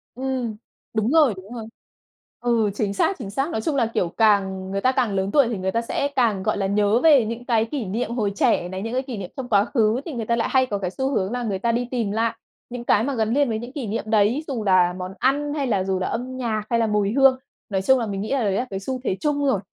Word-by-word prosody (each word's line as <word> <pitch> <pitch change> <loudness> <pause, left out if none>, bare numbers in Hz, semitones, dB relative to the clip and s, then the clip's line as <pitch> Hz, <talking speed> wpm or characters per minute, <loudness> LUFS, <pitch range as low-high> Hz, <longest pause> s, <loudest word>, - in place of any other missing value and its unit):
Ừm, 255 -3 -3 0.4
đúng 220 +3 0
rồi, 305 -8 +5
đúng 190 +5 -11
rồi. 230 -2 -6 0.7
Ừ, 235 -3 +1
chính 205 -1 -1
xác, 385 - +1
chính 220 -7 -6
xác. 270 +10 -1
Nói 220 - -2
chung 295 +5 -1
là, 250 -4 +3
kiểu, 175 - 0
càng 195 -3 +2
người 195 0 -2
ta 255 - +3
càng 240 -5 0
lớn 190 +1 -1
tuổi 280 -4 +4
thì 230 -3 -2
người 190 0 -2
ta 230 +4 0
sẽ 280 +4 -1
càng, 220 -7 +2
gọi - - 0
là, 195 - -1
nhớ 205 +3 +2
về 285 -7 +5
những 230 +2 -5
cái 230 -3 +2
kỷ 245 0 -4
niệm 225 +5 -3
hồi 215 -4 -1
trẻ 175 -2 +2
này, 185 +1 -5
những 225 +3 -4
cái 260 - +1
kỷ 260 -4 -6
niệm 185 -3 -6
trong 255 -1 -5
quá 205 -1 +4
khứ, 230 -1 +1
thì 325 - -5
người 230 -3 -3
ta 235 - +1
lại 230 - -1
hay 260 -1 +4
có 210 -5 -3
cái 190 -2 -3
xu 265 +6 -2
hướng 195 -4 0
là 245 0 -2
người 200 -4 -2
ta 235 +4 +1
đi 240 +1 -1
tìm 230 -6 -1
lại 225 +1 0 0.3
những 245 0 -6
cái 220 -2 +3
mà 280 +3 -1
gắn 220 -1 0
liền 285 -2 +2
với 220 - -1
những 240 +3 -8
kỷ 265 -7 -4
niệm 215 - -2
đấy, 220 +7 +2
dù 250 -7 -3
là 185 -3 +4
món 185 0 -6
ăn 290 +3 +1
hay 285 -3 -1
là 200 -6 +1
dù 190 -1 -1
là 185 - -1
âm 255 +3 -4
nhạc 220 -4 -2
hay 235 - +2
là 225 - +2
mùi 210 -1 +1
hương. 270 0 +5 0.3
Nói 190 -2 0
chung 265 +5 +4
là 230 - -1
mình 195 -1 -3
nghĩ 215 - -4
là 270 -4 +1
đấy 200 - +1
là 240 +6 0
cái 195 - -4
xu 255 +6 -4
thế 190 - -1
chung 290 -1 0
rồi. 265 -8 +2
230 Hz, 290 wpm, -23 LUFS, 200-255 Hz, 0.7 s, rồi